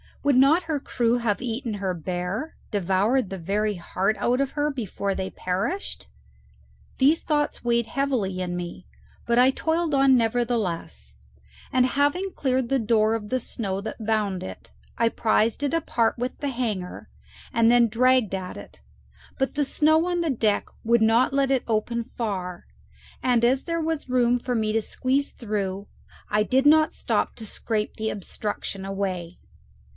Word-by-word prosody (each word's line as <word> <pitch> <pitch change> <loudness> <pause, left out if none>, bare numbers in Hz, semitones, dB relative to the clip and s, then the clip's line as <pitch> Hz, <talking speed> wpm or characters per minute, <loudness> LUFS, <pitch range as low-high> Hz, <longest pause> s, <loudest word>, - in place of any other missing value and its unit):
Would 285 -2 +3
not 280 +7 +5
her 315 -3 -2
crew 240 -3 +1
have 230 -1 -1
eaten 230 -2 -3
her 195 -2 -2
bare, 180 - -4 0.2
devoured 200 +4 +1
the 195 - -5
very 205 +4 -1
heart 190 +4 -1
out 250 +3 +1
of 275 - -1
her, 295 0 0
before 205 -6 -3
they 190 0 -3
perished? 195 - -3 0.9
These 290 +5 +4
thoughts 295 -4 -1
weighed 235 -1 +1
heavily 245 -9 -1
in 180 -1 -2
me, 175 +1 -6 0.4
but 235 0 +1
I 255 +1 +6
toiled 320 +2 -1
on 270 -1 +5
nevertheless, 220 - -1 0.6
and 255 -1 +4
having 290 +9 +1
cleared 260 -3 0
the 270 - +2
door 220 -1 +2
of 210 -2 -5
the 255 - +1
snow 195 -5 -4
that 220 +1 -6
bound 210 -4 0
it, 95 -9 -9 0.3
I 230 - +3
prized 225 +2 +1
it 285 - 0
apart 235 -8 +1
with 250 +2 -3
the 285 - -2
hanger 220 -8 -4 0.4
and 230 0 +4
then 240 -1 +5
dragged 250 -2 +3
at 185 -1 -4
it; - - -12 0.6
but 270 +1 -1
the 290 0 +1
snow 315 +4 +3
on 350 -1 0
the 330 -3 +1
deck 220 -5 +1 0.2
would 235 0 +3
not 230 +4 +4
let 275 -1 +2
it 265 -2 +2
open 230 +1 0
far, 190 -7 -4 0.6
and 245 -2 +2
as 260 +3 +3
there 335 -1 -1
was 315 -4 -2
room 245 -1 +3
for 250 +1 -3
me 215 -1 0
to 225 - +2
squeeze 270 +5 0
through, 200 -3 -3 0.4
I 210 0 +2
did 260 +5 +2
not 310 +1 +5
stop - - -1
to 225 - -9
scrape 215 0 -3
the 220 -1 -1
obstruction 200 -1 -4
away. 190 -3 -3
230 Hz, 165 wpm, -25 LUFS, 200-265 Hz, 0.9 s, I